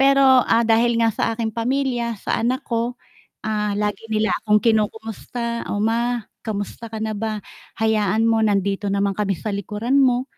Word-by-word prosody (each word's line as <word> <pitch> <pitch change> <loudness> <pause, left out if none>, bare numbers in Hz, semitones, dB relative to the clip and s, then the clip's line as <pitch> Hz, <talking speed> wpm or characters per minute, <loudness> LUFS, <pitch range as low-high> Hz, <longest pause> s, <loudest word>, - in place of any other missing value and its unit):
Pero 275 0 +5 0.2
,ah, 230 +1 +3
dahil 230 +1 +3
nga 230 -1 +3
sa 225 - -1
aking 225 -1 -2
pamilya, 240 0 -1
sa - - -2
anak 255 +4 0
ko, 235 +1 -2 0.5
ah, 210 -1 -1
lagi 205 -1 -1
nila 220 0 +1
akong 210 -1 +2
kinukumusta, 225 +1 -1
"Oh - - -2
ma, 235 +1 0 0.2
kamusta 220 +1 -5
ka 220 - -7
na 220 - -2
ba? 215 0 -3 0.3
Hayaan 220 -1 +2
mo 225 -1 +3
nandito 200 -1 +1
naman 200 0 +1
kami 195 -1 -1
sa 215 +5 -4
likuran 210 +7 0
mo. 255 -1 +3
225 Hz, 170 wpm, -22 LUFS, 210-235 Hz, 0.5 s, Pero